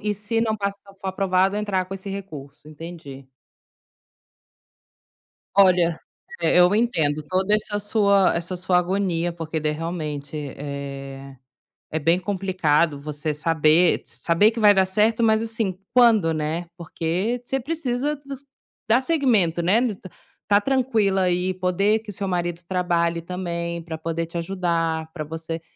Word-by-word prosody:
e 210 Hz, 0 st, -1 dB
se 210 Hz, +3 st, -2 dB
não 220 Hz, -1 st, 0 dB
passar, 200 Hz, 0 st, -5 dB
for 195 Hz, -, -4 dB
aprovado, 190 Hz, +1 st, +1 dB
entrar 200 Hz, -3 st, -1 dB
com 195 Hz, +1 st, -7 dB
esse 195 Hz, +1 st, -7 dB
recurso. 150 Hz, -7 st, -8 dB
Entendi. 155 Hz, -4 st, -10 dB, 2.3 s
Olha, 180 Hz, -4 st, +4 dB, 0.4 s
eh, -, -, +2 dB
eu 180 Hz, +3 st, +6 dB
entendo 160 Hz, -10 st, +1 dB
toda 190 Hz, +3 st, +2 dB
essa 210 Hz, -1 st, -1 dB
sua 200 Hz, -2 st, +3 dB
essa 170 Hz, +2 st, -3 dB
sua 180 Hz, 0 st, +2 dB
agonia, 175 Hz, -2 st, 0 dB
porque 160 Hz, -1 st, -4 dB
daí, 150 Hz, 0 st, 0 dB
realmente, 155 Hz, -3 st, -5 dB, 0.2 s
eh, 140 Hz, -1 st, -7 dB, 0.5 s
é 160 Hz, -, -2 dB
bem 165 Hz, +4 st, +2 dB
complicado 180 Hz, -6 st, +1 dB
você 150 Hz, +1 st, -4 dB
saber 160 Hz, +2 st, +3 dB
s -, -, -11 dB
saber 190 Hz, +7 st, +4 dB
que 230 Hz, -, -6 dB
vai 210 Hz, -1 st, +7 dB
dar 190 Hz, -1 st, +3 dB
certo, 215 Hz, +4 st, +2 dB
mas 220 Hz, 0 st, +3 dB
assim, 225 Hz, -5 st, -2 dB, 0.2 s
quando, 225 Hz, -9 st, +5 dB
né, 155 Hz, +3 st, -2 dB
porque 180 Hz, +7 st, -2 dB
você 270 Hz, -, -1 dB
precisa 290 Hz, 0 st, -2 dB
dos 275 Hz, 0 st, -8 dB, 0.4 s
dar 230 Hz, +3 st, +5 dB
segmento, 235 Hz, -, +2 dB
né, 185 Hz, +7 st, +3 dB, 0.2 s
ta 185 Hz, -, -12 dB, 0.5 s
estar -, -, +1 dB
tranquila 225 Hz, -6 st, +1 dB
aí, 180 Hz, 0 st, +1 dB
poder 185 Hz, +4 st, +1 dB
que 220 Hz, -1 st, -13 dB
o -, -, -5 dB
seu 195 Hz, +1 st, -4 dB
marido 175 Hz, -2 st, -2 dB
trabalhe 170 Hz, -2 st, 0 dB
também, 170 Hz, -1 st, -4 dB
para 160 Hz, -1 st, -6 dB
poder 165 Hz, +1 st, -3 dB
te 170 Hz, +1 st, -7 dB
ajudar, 165 Hz, -3 st, -1 dB
para 155 Hz, -3 st, -4 dB
você 160 Hz, +1 st, -6 dB
180 Hz, 150 wpm, -23 LUFS, 165-205 Hz, 2.3 s, vai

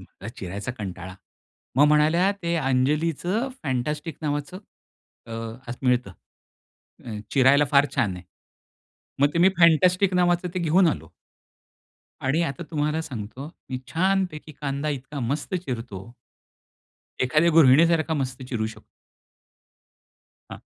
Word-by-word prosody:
मला 100 Hz, -, -11 dB
चिरायचा 100 Hz, +6 st, -5 dB
कंटाळा. 95 Hz, -2 st, -6 dB, 0.6 s
मग 145 Hz, +2 st, +6 dB
म्हणाल्या, 155 Hz, +5 st, +4 dB
"ते 170 Hz, 0 st, 0 dB
अंजलीचं 155 Hz, -, 0 dB
फॅन्टॅस्टिक 150 Hz, +4 st, -3 dB
नावाचं 145 Hz, +4 st, -3 dB, 0.7 s
अ, -, -, -12 dB, 0.4 s
खास 120 Hz, +1 st, -5 dB
मिळतं. 125 Hz, -6 st, +1 dB, 0.9 s
अ, -, -, -9 dB, 0.2 s
चिरायला 140 Hz, +2 st, +5 dB
फार 140 Hz, 0 st, +5 dB
छान 95 Hz, -5 st, +1 dB
आहे." 90 Hz, -, -10 dB, 1.0 s
मग 145 Hz, -, +5 dB
ते -, -, +1 dB
मी 180 Hz, +3 st, +6 dB
फॅन्टॅस्टिक 180 Hz, +3 st, +4 dB
नावाचं 175 Hz, 0 st, +2 dB
ते 185 Hz, -, -1 dB
घेऊन 170 Hz, +3 st, +4 dB
आलो. 80 Hz, -, -4 dB, 1.1 s
आणि 135 Hz, +6 st, +1 dB
आता 150 Hz, 0 st, -3 dB
तुम्हाला 150 Hz, 0 st, 0 dB
सांगतो, 130 Hz, +1 st, -7 dB, 0.2 s
मी 130 Hz, -, -2 dB
छानपैकी 180 Hz, -3 st, -1 dB
कांदा 140 Hz, +1 st, -2 dB
इतका 140 Hz, 0 st, -5 dB
मस्त 140 Hz, +9 st, -3 dB
चिरतो 120 Hz, -, -5 dB, 1.1 s
एखाद्या 155 Hz, +7 st, +3 dB
गृहिणीसारखा 160 Hz, +2 st, +5 dB
मस्त 130 Hz, 0 st, -6 dB
चिरू 120 Hz, -4 st, -3 dB
शकतो. 110 Hz, -, -11 dB, 1.6 s
हां. -, -, -9 dB
145 Hz, 120 wpm, -24 LUFS, 125-170 Hz, 1.6 s, मग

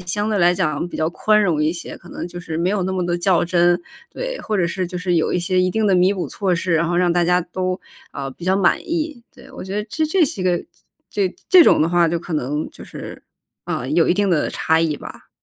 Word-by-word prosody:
相 205 Hz, +4 st, -2 dB
对 210 Hz, -, +1 dB
来 175 Hz, 0 st, +4 dB
讲 155 Hz, 0 st, -1 dB
比 -, -, -7 dB
较 160 Hz, +1 st, 0 dB
宽 215 Hz, +4 st, +2 dB
容 165 Hz, -6 st, +1 dB
一 155 Hz, -, +2 dB
些， 170 Hz, -, -7 dB
可 175 Hz, -, -16 dB
能 -, -, -6 dB
就 175 Hz, 0 st, -8 dB
是 160 Hz, -2 st, -5 dB
没 170 Hz, +3 st, +1 dB
有 205 Hz, -2 st, 0 dB
那 190 Hz, -, -2 dB
么 185 Hz, -1 st, -1 dB
地 175 Hz, 0 st, -1 dB
较 175 Hz, -1 st, +2 dB
真， 175 Hz, 0 st, +3 dB, 0.3 s
对， -, -, -5 dB
或 215 Hz, -, -2 dB
者 180 Hz, -3 st, +2 dB
是 180 Hz, +1 st, -2 dB
就 180 Hz, -, -6 dB
是 180 Hz, 0 st, -1 dB
有 160 Hz, -, +1 dB
一 -, -, +1 dB
些 185 Hz, +1 st, +1 dB
一 185 Hz, -, +2 dB
定 220 Hz, +2 st, 0 dB
的 195 Hz, -, +4 dB
弥 185 Hz, +2 st, +4 dB
补 185 Hz, -, -3 dB
措 190 Hz, -3 st, -1 dB
施， 170 Hz, +1 st, -1 dB
然 165 Hz, +1 st, +1 dB
后 175 Hz, -, 0 dB
让 175 Hz, -1 st, +3 dB
大 175 Hz, 0 st, +2 dB
家 180 Hz, +1 st, +3 dB
都， 185 Hz, +1 st, -3 dB, 0.3 s
呃， 135 Hz, -1 st, -5 dB
比 170 Hz, -, -11 dB
较 190 Hz, +1 st, +3 dB
满 185 Hz, -3 st, +3 dB
意， 310 Hz, -6 st, -3 dB
对。 260 Hz, +1 st, -16 dB
我 265 Hz, -, -8 dB
觉 190 Hz, +1 st, -6 dB
得 210 Hz, -, -1 dB
这 315 Hz, -, 0 dB
这 335 Hz, +2 st, +3 dB
是 230 Hz, -, -4 dB
个 180 Hz, -2 st, 0 dB, 0.5 s
这 190 Hz, -3 st, -1 dB
这 365 Hz, -2 st, +8 dB
种 -, -, +5 dB
的 160 Hz, -, +2 dB
话 175 Hz, 0 st, +3 dB
就 170 Hz, -, 0 dB
可 170 Hz, +1 st, -8 dB
能 150 Hz, +1 st, -2 dB
就 -, -, -12 dB
是， -, -, -9 dB, 0.4 s
呃， 125 Hz, -, -3 dB
有 165 Hz, +2 st, +3 dB
一 -, -, +4 dB
定 200 Hz, 0 st, +1 dB
的 160 Hz, -4 st, +1 dB
差 160 Hz, -, +1 dB
异 160 Hz, -3 st, 0 dB
吧。 -, -, -11 dB
180 Hz, 290 characters per minute, -20 LUFS, 170-195 Hz, 0.5 s, 这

